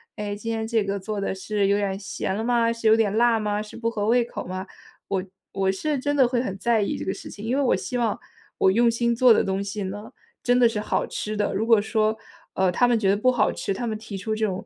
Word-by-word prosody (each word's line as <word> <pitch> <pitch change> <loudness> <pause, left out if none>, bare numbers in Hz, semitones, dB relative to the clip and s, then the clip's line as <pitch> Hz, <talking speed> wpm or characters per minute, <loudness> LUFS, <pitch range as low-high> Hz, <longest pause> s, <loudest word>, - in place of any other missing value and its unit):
“哎， 205 -1 -4
今 225 +2 -5
天 225 -1 -2
这 225 -2 +1
个 200 0 -2
做 210 +2 -4
的 195 - -1
是 200 +1 -1
有 200 - +3
点 200 -1 0
儿 190 - -3
咸 210 -1 -4
了 220 - -2
吗？ 235 -1 +2
是 230 -1 -2
有 220 - +7
点 215 -2 +1
辣 235 -1 +4
吗？ 210 -1 -1
是 210 - -10
不 230 0 -1
合 210 -3 -2
胃 240 +2 +3
口 235 - -7
吗？” 185 +1 -5 0.4
我 190 -2 0 0.3
我 190 -1 +1
是 290 +10 -2
真 290 +2 -1
的 265 -3 +5
会 245 -1 0
很 195 -6 -4
在 225 +2 +2
意 200 - -1
这 - - -5
个 190 - -2
事 - - -9
情， 205 - -10
因 245 +4 0
为 285 - +2
我 255 - +3
希 185 +7 -4
望 230 -3 0 0.4
我 190 - +5
用 235 +4 +4
心 235 +1 +1
做 240 0 +6
的 - - +3
东 195 0 -1
西 200 +1 -4
呢， 205 +6 -7 0.3
真 245 0 +3
的 240 -2 +6
是 220 -2 -3
好 210 - -1
吃 215 0 -4
的。 205 -1 0
如 210 +3 0
果 225 -3 +5
说， 220 0 0 0.4
呃， 190 -1 +2
他 245 +7 +3
们 240 -1 +3
觉 195 - +2
得 200 - +3
不 255 +4 +3
好 240 - +2
吃， 195 - -3
他 240 +5 -4
们 215 -1 -2
提 205 -2 -7
出 215 +3 -3
这 220 - 0
种 195 +1 -4
215 Hz, 305 characters per minute, -24 LUFS, 200-235 Hz, 0.4 s, 有